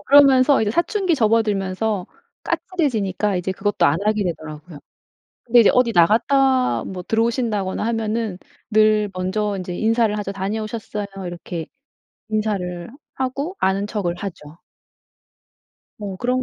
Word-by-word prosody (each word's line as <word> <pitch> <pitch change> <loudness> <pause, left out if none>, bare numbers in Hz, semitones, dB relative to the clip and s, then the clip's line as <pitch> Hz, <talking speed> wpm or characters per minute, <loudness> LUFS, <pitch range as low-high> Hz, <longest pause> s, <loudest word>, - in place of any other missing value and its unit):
그러면서 275 -2 +6
이제 210 - 0
사춘기 350 - +1
접어들면서 210 -4 0 0.4
까칠해지니까 210 - -1
이제 180 +1 -2
그것도 195 -1 0
안 145 +3 +2
하게 215 -1 +1
되더라고요. 155 -2 -6 0.7
근데 240 0 +5
이제 220 - +6
어디 250 -2 +3
나갔다 255 +8 +3
뭐 185 -1 -6
들어오신다거나 225 -3 0
하면은 225 -3 -2 0.3
늘 215 -1 +3
먼저 200 +3 -1
인제 180 -1 -5
인사를 225 0 +2
하죠. 200 -1 -4
"다녀오셨어요." 210 +1 -4 0.2
이렇게 175 -2 -6 0.6
인사를 195 -5 -2 0.3
하고 275 +8 -3
아는 195 +2 +1
척을 200 -5 -2
하죠. 170 -5 -8 1.4
어 200 -3 -5
그런 250 +5 0
210 Hz, 315 characters per minute, -21 LUFS, 185-235 Hz, 1.4 s, 그러면서